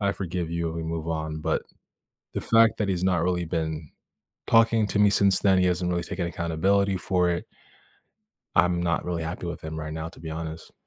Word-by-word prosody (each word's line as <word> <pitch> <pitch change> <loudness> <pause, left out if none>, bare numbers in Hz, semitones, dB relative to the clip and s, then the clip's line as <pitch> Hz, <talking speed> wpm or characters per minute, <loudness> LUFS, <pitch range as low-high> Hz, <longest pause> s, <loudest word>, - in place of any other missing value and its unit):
"I 100 -1 +1
forgive 90 -3 -4
you," 85 -1 -2
we 80 0 -4
move 80 0 -4
on, 80 -1 -3
but - - 0 0.7
the - - -1
fact 115 0 +4
that 105 - 0
he's 90 -2 0
not 90 -3 +2
really 90 0 0
been 80 -2 -3 0.6
talking 115 -1 +4
to 100 - -1
me 105 0 +6
since 100 -1 +3
then, 95 -2 +4
he 90 - +3
hasn't 90 0 0
really 85 -1 0
taken 90 -1 -3
accountability 95 +4 +1
for 90 -1 +1
it 85 - -2 1.1
I'm 90 0 +3
not 85 -2 0
really 85 -2 -2
happy 80 +2 -4
with 85 - -5
him 80 0 -6
right 75 0 -5
now, 80 +1 -4
to 80 - -15
be 80 0 -6
honest. 80 0 -6
85 Hz, 205 wpm, -26 LUFS, 80-95 Hz, 1.1 s, me